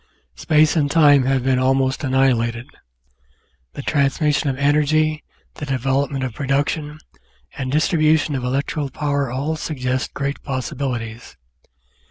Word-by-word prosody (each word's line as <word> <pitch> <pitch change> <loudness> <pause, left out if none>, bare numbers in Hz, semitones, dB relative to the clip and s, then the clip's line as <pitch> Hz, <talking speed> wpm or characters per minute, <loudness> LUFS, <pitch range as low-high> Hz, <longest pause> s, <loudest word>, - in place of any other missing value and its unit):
Space 155 +1 +2
and 145 -3 +1
time 145 -4 +5
have 135 -1 +1
been 130 -1 +2
almost 130 +2 +1
annihilated; 125 -3 +1 1.1
the - - -7
transmis 145 +1 +1
sion 145 - -1
of 130 - -3
energy, 150 +2 +2 0.3
the 150 - -7
development 135 +1 -1
of 130 -3 -3
production, 145 +3 -2 0.6
and 130 -2 -4
distribution 155 0 +2
of 130 -2 -3
electrical 140 +3 -2
power 140 0 -1
all 140 +6 -2
suggest 130 -4 -3
great 140 0 -3
possibilities. 125 -4 -5
140 Hz, 125 wpm, -20 LUFS, 130-150 Hz, 1.1 s, time